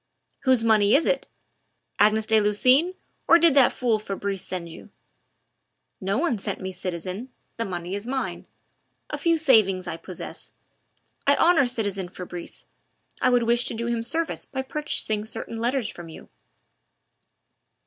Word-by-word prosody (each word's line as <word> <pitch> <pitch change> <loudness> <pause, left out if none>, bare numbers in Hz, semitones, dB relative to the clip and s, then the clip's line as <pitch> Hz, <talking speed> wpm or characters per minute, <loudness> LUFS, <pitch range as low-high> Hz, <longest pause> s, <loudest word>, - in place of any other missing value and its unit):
"Whose 260 -3 +4
money 215 -1 +4
is 315 - +3
it? - - 0 0.7
Agnes 215 +1 +4
de 220 -1 +4
Lucines' 255 - +3 0.3
or 335 - +8
did 335 -3 +5
that 270 -3 +5
fool 235 -4 0
Fabrice 200 -2 -4
send 180 -2 -5
you?" 165 - -12 1.1
"No 195 +3 -1
one 275 -7 0
sent - - -4
me, 190 0 -5
citizen. 185 +5 -5 0.3
The 230 - -2
money 175 -1 -5
is 205 +3 -4
mine 265 +1 -3 0.6
a - - -2
few 335 -2 +2
savings 215 - +4
I 170 -2 -4
possess 185 +1 -8 0.7
I 280 - +6
honour 330 -6 +4
citizen 200 -7 -2
Fabrice 180 -1 -8 0.6
I 255 - +4
would 245 -1 +3
wish 235 +1 +3
to 250 - -2
do 230 +1 -3
him 235 -1 -1
service 320 +8 -2
by 265 -1 -4
purchasing 265 -7 -1
certain 225 +1 -6
letters 240 0 0
from 175 -5 -9
you." 160 - -12
225 Hz, 150 wpm, -25 LUFS, 195-265 Hz, 1.1 s, or